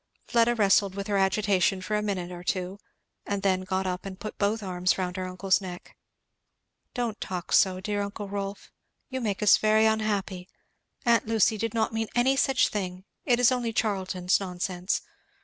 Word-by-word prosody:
Fleda 235 0 +3
wrestled 200 -2 +3
with 200 0 -4
her 205 -1 0
agitation 195 -1 +2
for 200 +3 -3
a 210 - +1
minute 190 -4 -3
or 175 0 -8
two, 185 +1 -2 0.4
and 200 -1 -3
then 190 -1 +2
got 190 0 -2
up 180 0 -3
and 195 -1 -8
put 215 - -7
both 210 +2 0
arms 180 -1 0
round 180 -1 -2
her 185 -1 -3
uncle's 185 +1 +1
neck. 180 -2 -9 1.0
"Don't 235 -4 -2
talk 180 -2 -5
so, 185 -1 +4
dear 205 +1 -2
uncle 200 +1 -5
Rolf! 200 0 -5 0.4
you 260 -1 -4
make 210 -2 -2
us 210 - +7
very 215 0 +3
unhappy 205 -4 -1 0.6
aunt 235 -2 +3
Lucy 225 -1 +3
did 230 +1 -3
not 220 0 0
mean 225 0 -1
any 255 +3 +3
such 270 -1 +3
thing 185 -2 -4 0.2
it 245 -3 +3
is 245 0 +5
only 245 -2 -1
Charlton's 190 -5 0
nonsense. 180 0 -2
200 Hz, 180 wpm, -27 LUFS, 185-220 Hz, 1.0 s, us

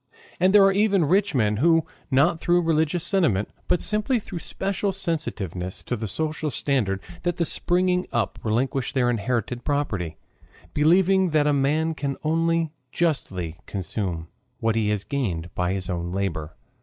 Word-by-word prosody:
And 185 +2 +4
there 205 0 +7
are 195 - +6
even 200 -3 +3
rich 195 +2 +2
men 105 -4 +2
who, 165 +4 +4 0.2
not 155 +5 +3
through 175 +1 +2
religious 160 +1 +1
sentiment, 165 - +1 0.2
but 180 - +2
simply 215 +7 +1
through 190 -5 -6
special 195 +3 -2
sensitiveness 105 - -3
to 125 - -2
the 110 -1 -4
social 155 +7 -2
standard 120 -10 0 0.2
that 175 0 -2
is 170 - +2
springing 180 0 +1
up, 115 -5 -1
relinquish 125 +4 -1
their 125 -2 +2
inherited 120 +2 -2
property, 105 - -2 0.6
believing 185 +5 +4
that 145 - +3
a 150 - +3
man 150 +4 +1
can 140 -2 -3
only 165 0 +1 0.2
justly 95 - -1
consume 90 -4 -3 0.3
what 115 -1 +1
he 110 -2 +1
has 105 -2 0
gained 90 -13 -3
by 90 0 0
his 95 -2 -3
own 85 -2 -3
labor. 85 -5 -3
145 Hz, 155 wpm, -24 LUFS, 105-175 Hz, 0.6 s, there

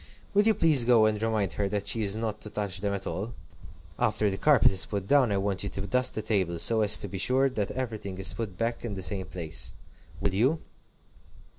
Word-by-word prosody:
Will 205 - +5
you 220 - +4
please 155 -8 +5
go 115 -2 +5
and 110 -1 0
remind 110 -6 -1
her 100 -1 -2
that 100 0 -3
she 115 - 0
is 100 -1 +1
not 110 -1 -4
to 105 - -7
touch 100 -3 -3
them 100 -1 -1
at 100 -1 -4
all? 110 +5 -5 0.6
After 105 -3 +1
the 95 - -4
carpet 145 -9 +5
is 95 -1 +1
put 100 -2 -4
down, 130 0 +3
I 100 - +1
want 95 -1 -1
you 100 - -3
to 95 - -5
dust 125 +6 +2
the 110 - -3
table, 95 -6 0
so 110 +7 +3
as 105 0 +4
to - - -5
be 95 0 -6
sure 130 +6 +2
that 105 -5 -2
everything 110 -7 -5
is 95 - 0
put 105 -6 -6
back 115 +1 -2
in 110 -4 -4
the 95 - -5
same 95 -2 -2
place. 80 -1 -3 0.5
Will 100 - -1
you?" 130 +11 +2
105 Hz, 235 wpm, -27 LUFS, 95-115 Hz, 0.6 s, Will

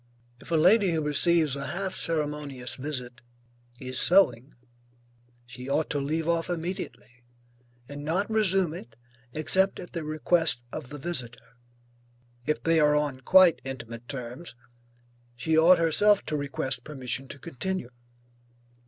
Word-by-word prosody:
If - - -14
a 170 - +1
lady 185 +3 +4
who 160 - 0
receives 150 0 +2
a 140 0 -5
half 190 +1 -3
ceremonious 150 -6 -2
visit 125 -4 -5 0.6
is 130 0 -3
sewing, 140 -9 +3 0.9
she 125 +2 -9
ought 150 +3 0
to 145 - 0
leave 155 +3 -2
off 170 0 0
immediately, 175 -7 -5 0.7
and 145 0 -8
not 175 +7 0
resume 195 -6 +2
it 120 -8 -10 0.4
except 185 +6 +2
at 180 - -9
the 170 -3 -4
request 155 -3 +1
of 125 - -7
the 145 - -7
visitor. 130 -7 -5 0.9
If 150 - -1
they 165 0 +3
are 150 -1 +4
on 145 -3 -1
quite 180 +4 +5
intimate 120 -3 -8
terms, 125 +3 -7 0.8
she 145 +6 0
ought 170 +3 +6
herself 195 +5 +3
to 155 - -3
request 135 -3 -2
permission 135 -2 -4
to 140 - -7
continue. 140 +1 -4
150 Hz, 135 wpm, -27 LUFS, 130-170 Hz, 0.9 s, ought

